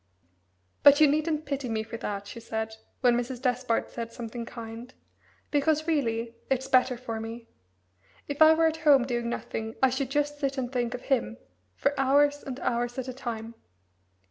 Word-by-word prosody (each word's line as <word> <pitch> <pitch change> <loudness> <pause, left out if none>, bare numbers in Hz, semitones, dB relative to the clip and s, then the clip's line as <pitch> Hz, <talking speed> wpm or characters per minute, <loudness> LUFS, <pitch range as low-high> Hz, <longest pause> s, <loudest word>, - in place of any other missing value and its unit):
"But 285 +1 +8
you 310 - +8
needn't 305 +1 +1
pity 280 -3 -3
me 220 -1 -1
for 225 +1 -8
that," 200 -3 -4
she 205 - -8
said, 220 -1 -4 0.3
when 245 -2 +5
Mrs. 245 +1 -2
Despard 250 -2 0
said 230 -1 -5
something 230 0 -6
kind, 230 +1 -8 0.6
"because, 305 +1 +2
really, 235 -8 0 0.2
it's 265 0 0
better 255 -1 +3
for 230 -2 -5
me. 230 +1 -7 0.8
If 285 +1 -5
I 315 0 +9
were 325 0 +3
at 320 0 +1
home 290 -5 +5
doing 240 -2 -2
nothing 225 -1 -4
I 260 - +6
should 260 0 -2
just 290 +1 -1
sit 275 -1 -1
and 250 -2 -2
think 245 -1 -1
of 250 - -8
him 175 - 0 0.4
for 280 - +1
hours 285 +2 +3
and 265 -1 -6
hours 240 +1 -1
at 260 -1 -3
a - - -4
time. 230 -3 -5
250 Hz, 180 wpm, -28 LUFS, 230-280 Hz, 0.8 s, I